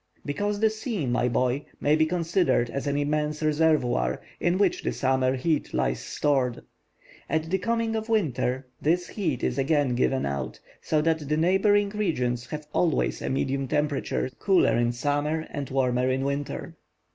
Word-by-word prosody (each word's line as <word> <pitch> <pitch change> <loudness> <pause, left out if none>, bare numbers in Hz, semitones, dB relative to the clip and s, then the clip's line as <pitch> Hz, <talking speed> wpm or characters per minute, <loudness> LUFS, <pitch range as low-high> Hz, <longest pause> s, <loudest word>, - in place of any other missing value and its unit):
"Because 205 +8 -1
the 220 0 +3
sea, 220 - -3
my 125 0 +1
boy, 125 +4 0 0.2
may 150 +1 +3
be 155 0 +3
considered 170 -7 +1
as 140 +1 -3
an 140 0 0
immense 150 +1 -1
reservoir, 150 - +2 0.2
in 175 +1 +1
which 195 -3 +2
the - - -1
summer 130 -1 +1
heat 150 +4 -1
lies 60 0 0
stored. 135 -4 0 0.7
At 160 +1 -1
the 190 - +2
coming 230 +2 0
of 220 +1 -3
winter 135 - 0 0.2
this 175 +4 +1
heat 160 - -2
is 125 - 0
again 145 -2 +2
given 130 +2 +1
out, 70 0 -4 0.2
so 155 -1 +1
that 160 -3 0
the 150 - +1
neighboring 200 +4 +3
regions 125 - -1
have 150 0 -6
always 170 -4 +1
a - - -2
medium 135 0 -1
temperature, 145 -2 -1
cooler 195 -3 +3
in 120 0 +2
summer 145 +5 -1
and 140 -3 -4
warmer 130 -1 +1
in 130 +1 0
winter." 140 +1 -4
150 Hz, 165 wpm, -26 LUFS, 130-175 Hz, 0.7 s, the